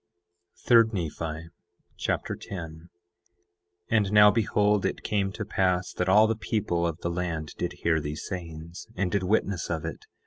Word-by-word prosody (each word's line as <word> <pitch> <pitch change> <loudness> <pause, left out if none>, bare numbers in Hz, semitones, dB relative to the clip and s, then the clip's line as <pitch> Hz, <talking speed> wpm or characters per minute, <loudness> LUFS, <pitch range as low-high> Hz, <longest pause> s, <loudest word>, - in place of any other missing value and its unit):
3 115 -2 +7
Nephi 80 -2 -4 0.5
Chapter - - -2
10 80 -3 -8 1.0
10:1 - - +3
And 105 -3 +2
now 105 0 +8
behold, 105 -1 +2
it - - -2
came 100 -2 0
to 105 - -5
pass 95 -3 0
that 90 +1 -1
all 105 +3 +7
the 110 0 +1
people 95 -6 -1
of 80 -2 -3
the 85 - -2
land 85 -3 -3
did 90 0 -2
hear 80 -1 +3
these 75 +1 -5
sayings, 85 -2 -7
and 90 -1 -1
did 100 - +1
witness 100 -1 0
of 80 -2 -2
it. 80 - -7
90 Hz, 165 wpm, -27 LUFS, 80-105 Hz, 1.0 s, now